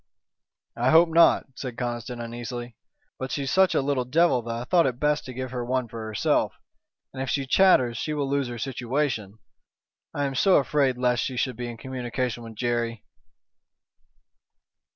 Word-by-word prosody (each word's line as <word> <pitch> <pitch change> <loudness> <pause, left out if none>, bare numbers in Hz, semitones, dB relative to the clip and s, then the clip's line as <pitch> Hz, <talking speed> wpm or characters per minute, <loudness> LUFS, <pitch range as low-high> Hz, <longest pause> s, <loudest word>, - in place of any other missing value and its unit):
"I 120 +2 +1
hope 165 +3 +6
not," 165 +1 +5
said 125 -2 -7
Conniston, 120 0 -4
uneasily, 120 0 -6 0.4
"but 130 0 -4
she's 140 -2 -2
such 190 0 +4
a - - +2
little 135 -2 0
devil 145 0 +3
that 115 0 -5
I 120 - -4
thought 170 +4 +3
it 125 -2 -3
best 150 0 +1
to 130 - -7
give 130 0 -5
her 125 -1 -3
one 125 0 -1
for 115 0 -7
herself. 110 -1 0 0.6
And 130 - -5
if 135 - -3
she 140 -2 0
chatters 130 - +4
she 155 +5 -2
will 145 -2 -1
lose 140 -1 0
her 120 0 -6
situation. 125 -4 -2 0.7
I 145 - -1
am 135 - -2
so 185 +8 +4
afraid 140 -2 +2
lest 125 -1 +1
she 130 -2 -4
should 130 0 -1
be 120 +1 -5
in 120 - -8
communication 125 -1 -3
with 115 -1 -10
Jerry." 120 -1 -2
125 Hz, 175 wpm, -25 LUFS, 120-140 Hz, 0.7 s, hope